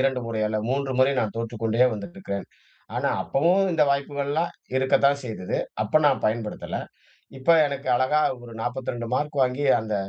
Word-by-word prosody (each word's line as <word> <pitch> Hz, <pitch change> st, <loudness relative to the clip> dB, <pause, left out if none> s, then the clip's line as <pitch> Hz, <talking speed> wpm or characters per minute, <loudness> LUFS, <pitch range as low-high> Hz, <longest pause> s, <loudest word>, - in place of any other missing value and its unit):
2 130 Hz, -1 st, +1 dB
முறை 110 Hz, -1 st, -2 dB
அல்ல, 110 Hz, 0 st, -1 dB
மூன்று 135 Hz, 0 st, -1 dB
முறை 135 Hz, +2 st, +5 dB
நான் 110 Hz, -1 st, -2 dB
தோற்றுக்கொண்டே 115 Hz, +1 st, +1 dB
வந்திட்டிருக்கேன். 105 Hz, -, -6 dB, 0.5 s
ஆனா -, -, +1 dB
அப்பவும் 175 Hz, +7 st, +2 dB
இந்த 160 Hz, -, +3 dB
வாய்ப்புகள்லாம் 140 Hz, +3 st, -1 dB, 0.3 s
இருக்கத்தான் 140 Hz, +2 st, +3 dB
செய்தது. 105 Hz, -6 st, -4 dB, 0.3 s
அப்ப 110 Hz, +9 st, +2 dB
நான் 135 Hz, -, +3 dB
பயன்படுத்தல. 110 Hz, 0 st, -2 dB, 0.6 s
இப்ப 130 Hz, +5 st, -4 dB, 0.2 s
எனக்கு 140 Hz, -1 st, -4 dB
அழகா 130 Hz, +5 st, +2 dB, 0.2 s
ஒரு 115 Hz, -1 st, -10 dB
42 120 Hz, -1 st, -3 dB
மார்க் 145 Hz, 0 st, -2 dB
வாங்கி, 130 Hz, +3 st, +1 dB
அந்த 110 Hz, -1 st, -3 dB
130 Hz, 150 wpm, -25 LUFS, 115-140 Hz, 0.6 s, முறை